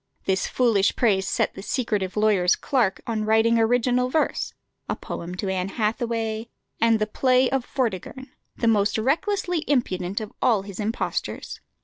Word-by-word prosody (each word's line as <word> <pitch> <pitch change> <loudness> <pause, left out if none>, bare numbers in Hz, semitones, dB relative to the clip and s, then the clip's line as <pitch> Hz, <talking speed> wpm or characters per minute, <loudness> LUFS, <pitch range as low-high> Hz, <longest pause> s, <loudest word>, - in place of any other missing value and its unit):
This 190 0 +1
foolish 225 -6 +2
praise 195 -5 +2
set - - 0
the - - -8
secretive 210 -4 -2
lawyer's 205 -4 +3
clerk 240 -8 0
on 225 -3 -2
writing 220 +2 +3
original 245 +2 +2
verse, 315 +4 0 0.4
a - - 0
poem 175 +1 -6
to 195 - -4
Anne 190 0 -1
Hathaway, 225 +1 -2 0.3
and 230 0 +4
the 215 - 0
play 255 +4 +3
of 265 -2 -1
"Vortigern," 260 +2 -3 0.2
the 230 - -1
most 210 -2 +3
recklessly 340 - 0
impudent 195 -9 0
of 215 -1 -7
all 225 -6 +3
his 200 0 -9
impostures. 215 +2 -3
225 Hz, 150 wpm, -24 LUFS, 200-250 Hz, 0.4 s, and